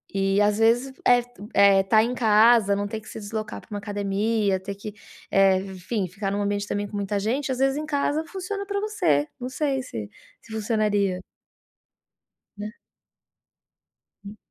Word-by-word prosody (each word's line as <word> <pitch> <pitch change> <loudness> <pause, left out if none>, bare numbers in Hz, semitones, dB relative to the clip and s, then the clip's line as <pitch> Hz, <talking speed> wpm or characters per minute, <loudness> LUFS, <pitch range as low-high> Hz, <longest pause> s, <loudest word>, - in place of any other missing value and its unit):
E, 195 +1 +2
às 205 0 +3
vezes, 240 +4 +3
eh 245 0 +6
tu 245 -4 -13
eh, 200 -1 +6
tá 215 +3 +4
em 240 +2 -1
casa 220 -2 +5
não 205 0 -2
ter 215 +1 -5
que - - -17
se - - -8
deslocar 215 +1 -5
pra - - -22
uma 205 - -4
academia, 205 0 0
ter 200 +1 -6
que, 200 +1 -8 0.4
eh, 195 -1 +4
enfim, 190 +1 -4
ficar 195 +2 -4
num 200 +1 -1
ambiente 205 0 -1
também 205 0 -2
com 205 - -9
muita 200 0 -1
gente, 260 +7 -1
às 255 - -3
vezes, 270 +1 +2
em 305 - -3
casa, 295 +1 0
funciona 390 +3 -5
pra 400 0 -2
você. 400 - +1
Não 250 - -4
sei 275 -1 -1
se 110 - -6 0.3
se 225 - -16
funcionaria. 210 -4 0 1.4
Né. 210 +1 -5 1.5
Hum. 205 +2 -9
210 Hz, 175 wpm, -25 LUFS, 200-245 Hz, 1.5 s, eh